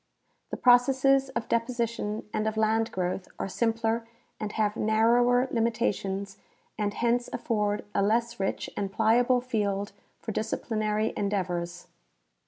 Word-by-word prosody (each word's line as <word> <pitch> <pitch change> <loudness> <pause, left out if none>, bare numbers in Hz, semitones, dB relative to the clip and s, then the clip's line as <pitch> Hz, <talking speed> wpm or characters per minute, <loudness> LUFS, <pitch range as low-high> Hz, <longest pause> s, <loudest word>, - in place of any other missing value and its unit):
The - - -4
processes 265 +2 +4
of - - -2
deposi 235 0 0
tion 215 -2 -5
and 215 - 0
of 220 0 -2
land 220 +1 +2
growth 185 0 -2
are - - -3
simpler 225 +3 0 0.3
and 215 -1 -3
have 210 -1 0
narrower 240 +3 +3
limita 230 -1 +1
tions 195 0 -5 0.4
and 210 -1 -1
hence 240 +1 +1
aff"orcl 210 -2 -1
a - - +2
less 235 +3 +1
rich 195 - -2
and 200 -1 -2
pliable 240 +4 +3
field 205 -4 -1 0.3
for 220 - -5
disciplinary 215 0 -1
endeavors. 175 -3 -2
220 Hz, 135 wpm, -28 LUFS, 205-235 Hz, 0.4 s, processes